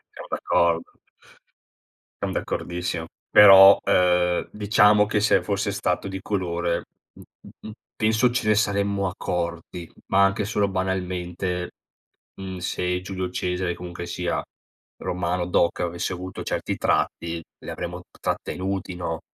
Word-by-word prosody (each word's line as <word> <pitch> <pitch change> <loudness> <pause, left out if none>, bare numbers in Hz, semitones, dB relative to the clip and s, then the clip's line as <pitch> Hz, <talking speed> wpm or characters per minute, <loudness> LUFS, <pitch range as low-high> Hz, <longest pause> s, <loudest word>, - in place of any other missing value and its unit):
siamo - - -9
d'accordo. 85 -1 0 1.2
Siam - - -1
d'accordissimo 85 -1 -3 0.2
però, 95 -1 +9
ehm, 90 -1 +2
diciamo 105 0 +4
che 105 0 0
se 105 - +3
fosse 100 0 -1
stato 90 -1 -1
di 95 -1 -6
colore, 85 -4 -2 0.3
mh-mh, - - -16
mh - - -7 0.3
penso 110 +3 +3
ce 120 -2 -1
ne 105 - +4
saremmo 100 -2 +1
accorti 85 -1 -4 0.2
ma 100 +1 +4
anche 100 +1 +1
solo 105 -1 0
banalmente, 90 -1 -3 0.7
mhmm, 95 -1 -6
se 90 0 -2
Giulio 95 -1 -4
Cesare 90 0 -2
comunque 85 0 -7
sia, 85 0 -2 0.6
Romano 90 0 -2
doc, 85 -1 +1
avesse 85 +1 -2
avuto 90 +1 -7
certi - - -3
tratti 85 0 -1 0.2
li - - -9
avremmo - - -6 0.2
trattenuti, 95 -1 -3
no? 85 -2 -4
90 Hz, 125 wpm, -24 LUFS, 90-100 Hz, 1.2 s, però